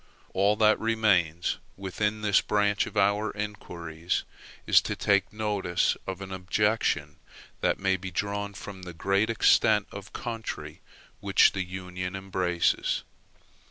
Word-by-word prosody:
All 100 +2 +3
that 110 0 +4
remains, 95 -8 +1 0.2
within 105 +3 -2
this 105 -2 +4
branch 105 -1 +1
of - - -8
our 100 +2 +3
inquiries, 85 -5 -4 0.4
is - - +6
to - - -3
take 100 -2 +2
notice 105 -5 0
of 95 0 -4
an 95 0 -7
objection 105 +4 0 0.4
that - - +1
may 95 -1 +1
be 95 +1 -6
drawn 100 +2 -3
from 95 0 -8
the 90 -1 -8
great 100 +5 +1
extent 110 -1 +4
of 100 -1 -9
country 115 -3 -6 0.4
which - - +5
the 95 - -2
Union 90 0 -5
embraces. 90 -2 0
100 Hz, 130 wpm, -27 LUFS, 90-105 Hz, 0.4 s, is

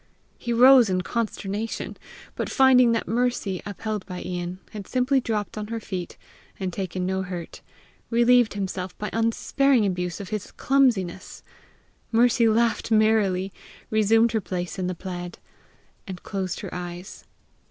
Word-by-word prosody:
He 240 - -4
rose 250 -1 +7
in 185 -1 +1
consternation; 215 0 -3 0.4
but - - -3
finding 255 -3 +5
that 230 - -1
Mercy, 235 -5 -1
upheld 210 0 -4
by 180 -1 -6
Ian, 180 0 -4
had 205 -3 -8
simply 260 +2 +2
dropped 215 -2 -3
on 210 - -5
her 230 +1 -4
feet, 185 -5 -6 0.4
and 185 -2 -3
taken 185 -1 -3
no 190 +1 -1
hurt, 180 -3 -7 0.5
relieved 240 -1 +4
himself 190 -2 -4
by 210 -1 -4
unsparing 230 +2 +2
abuse 180 -3 -2
of 200 - -7
his 215 -2 -4
clumsiness. 230 -10 0 0.7
Mercy 235 0 +4
laughed 225 0 +1
merrily, 215 -4 +2 0.4
resumed 220 +2 +4
her 220 - 0
place 180 0 -4
in 180 - -1
the 185 - -3
plaid, 175 -1 -6 0.7
and 185 -2 -7
closed 190 -3 -3
her - - -7
eyes. 175 +1 -7
210 Hz, 140 wpm, -25 LUFS, 185-230 Hz, 0.7 s, rose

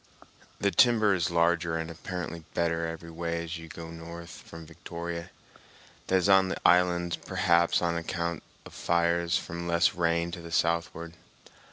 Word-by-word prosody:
The 100 - +2
timber 115 -6 +5
is 85 -2 0
larger 85 -1 +2
and 80 0 -4
apparently 85 0 -6
better 85 -1 0
every 85 0 -7
way 85 0 -3
as 85 0 -5
you 80 - -10
go 80 0 -9
north 85 +1 -9
from 80 0 -11
Victoria, 85 +1 -6 0.8
that 95 - +2
is 95 0 +3
on 95 -1 +6
the - - -2
islands, 90 -1 +3
perhaps 85 +1 +2
on 85 -1 +1
account 85 0 -3 0.2
of - - -12
fires 85 +1 +1
from 85 +1 -5
less 85 +3 +3
rain 85 -1 0
to 85 - -7
the 85 0 -10
southward. 85 0 0
85 Hz, 160 wpm, -28 LUFS, -, 0.8 s, on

